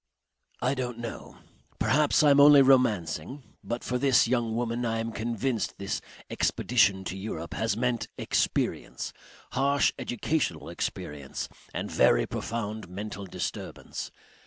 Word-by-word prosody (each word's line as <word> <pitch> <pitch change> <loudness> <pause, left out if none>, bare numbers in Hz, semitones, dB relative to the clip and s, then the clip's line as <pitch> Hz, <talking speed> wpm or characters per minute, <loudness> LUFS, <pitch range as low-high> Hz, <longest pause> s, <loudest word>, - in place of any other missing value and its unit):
"I - - +2
don't 125 -3 -3
know. 120 -1 -7 0.4
Perhaps 150 +1 +3
I 145 - +6
am 140 - +6
only 145 -1 +9
romancing. 120 - +2 0.2
But 120 +1 -4
for 125 0 -1
this 130 -4 +4
young 115 -2 0
woman 120 0 -1
I 115 -1 0
am 115 0 -2
convinced 115 +1 -2
this 100 0 -3 0.3
expedition 100 -5 +2
to 95 - -4
Europe 95 -4 -5
has 110 0 -1
meant 120 -1 0
experience, - - -1 0.4
harsh 140 +1 +2
educational 155 +5 -1
experience 70 -2 -4 0.2
and - - -4
very - - +4
profound 110 -3 -4
mental 100 +1 -6
disturbance. - - -5
115 Hz, 130 wpm, -28 LUFS, 105-130 Hz, 0.4 s, only